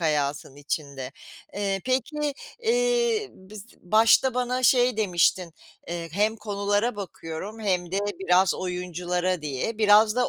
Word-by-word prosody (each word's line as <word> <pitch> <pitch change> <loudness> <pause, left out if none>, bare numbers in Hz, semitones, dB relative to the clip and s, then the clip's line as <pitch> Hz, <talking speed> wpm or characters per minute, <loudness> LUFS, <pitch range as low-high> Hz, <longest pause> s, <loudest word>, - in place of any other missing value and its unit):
hayatın 145 -3 -1
içinde. 140 -2 -5 0.4
Eee, 195 -1 -1
peki, 285 +3 -1 0.3
eee, 475 -2 +1
biz 200 +2 -12
başta 225 +6 +4
bana 250 0 -1
şey 250 -1 +4
demiştin, 180 -3 +1 0.4
eee, 170 -1 -4
hem 210 +4 +1
konulara 205 +1 -1
bakıyorum 195 +2 -7
hem 180 -4 -1
de 195 - +1 0.2
biraz 185 0 +3
oyunculara 180 -1 -2
diye. 150 - -3
Biraz 215 +1 +5
da 250 - +2
200 Hz, 125 wpm, -25 LUFS, 175-235 Hz, 0.4 s, Biraz